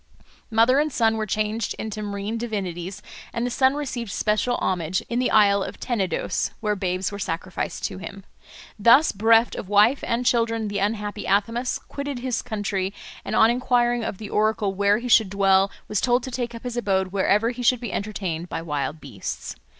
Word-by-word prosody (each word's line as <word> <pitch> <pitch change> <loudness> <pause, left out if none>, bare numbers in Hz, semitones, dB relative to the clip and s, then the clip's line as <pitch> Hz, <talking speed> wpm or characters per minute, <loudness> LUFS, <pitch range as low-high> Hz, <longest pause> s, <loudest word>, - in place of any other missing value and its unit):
Mother 230 +5 +4
and 305 +1 +1
son 225 -3 +2
were 215 -1 -2
changed 215 +2 -1
into 215 -1 -5
marine 205 +1 -4
divinities, 200 -4 -4 0.3
and 235 - -2
the 245 - -2
son 265 +2 +3
received 255 -6 -4
special 215 +5 0
homage 180 0 -1
in 240 - 0
the 255 - +1
isle 200 -2 +5
of - - -5
Tenedos, 195 -9 -1
where 210 -2 0
babes 185 -1 -2
were 200 - -6
sacrificed 175 0 -4
to - - -4
him. 195 +1 -8 0.6
Thus 235 +9 +6
bereft 225 +3 +4
of 190 - -6
wife 210 +6 +4
and 240 +2 0
children 230 -2 +1
the 205 0 -2
unhappy 210 +1 -2
Athamas 230 +6 +1
quitted 280 -1 -6
his 245 -1 -2
country, 200 -2 -3 0.3
and - - -3
on 220 +1 +6
enquiring 240 -1 +1
of 205 - -4
the 210 0 -8
oracle 215 -2 +1
where 200 +1 +3
he 240 +2 -5
should 220 -4 +5
dwell 195 0 +3 0.2
was 210 - -1
told 245 0 +2
to 260 - -6
take 240 -1 -3
up 230 - -9
his 245 -1 -4
abode 190 -5 +1
wherever 200 +4 +2
he 250 0 -7
should 245 0 +3
be 240 -2 -5
entertained 185 -5 -3
by 165 - -4
wild 150 0 -3
beasts. 115 -9 -6
215 Hz, 190 wpm, -24 LUFS, 195-240 Hz, 0.6 s, Thus